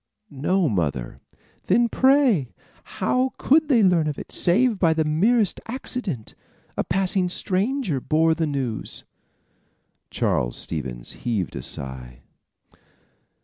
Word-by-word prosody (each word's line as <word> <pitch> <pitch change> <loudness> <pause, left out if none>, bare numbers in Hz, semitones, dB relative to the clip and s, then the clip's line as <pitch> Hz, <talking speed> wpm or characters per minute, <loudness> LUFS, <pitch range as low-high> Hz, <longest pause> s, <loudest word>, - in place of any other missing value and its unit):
"No, 165 +6 +1
mother." 75 - -2 0.5
"Then, 235 +5 +4
pray, 260 - +3 0.5
how 255 +6 +1
could 310 +3 +3
they 240 -6 +4
learn 175 -5 +3
of 150 - -3
it - - -8
save 220 +4 +2
by 165 -3 +3
the 160 -1 +1
merest 200 +8 +2
accident? 225 - -4 0.4
A - - 0
passing 185 +1 +1
stranger 195 - -1
bore 160 +3 +2
the 160 -1 -1
news." 130 -6 -3 1.1
Charles - - -1
Stevens 65 -7 -4
heaved 105 -8 -2
a - - -4
sigh. 65 -2 -7
170 Hz, 115 wpm, -23 LUFS, -, 1.1 s, Then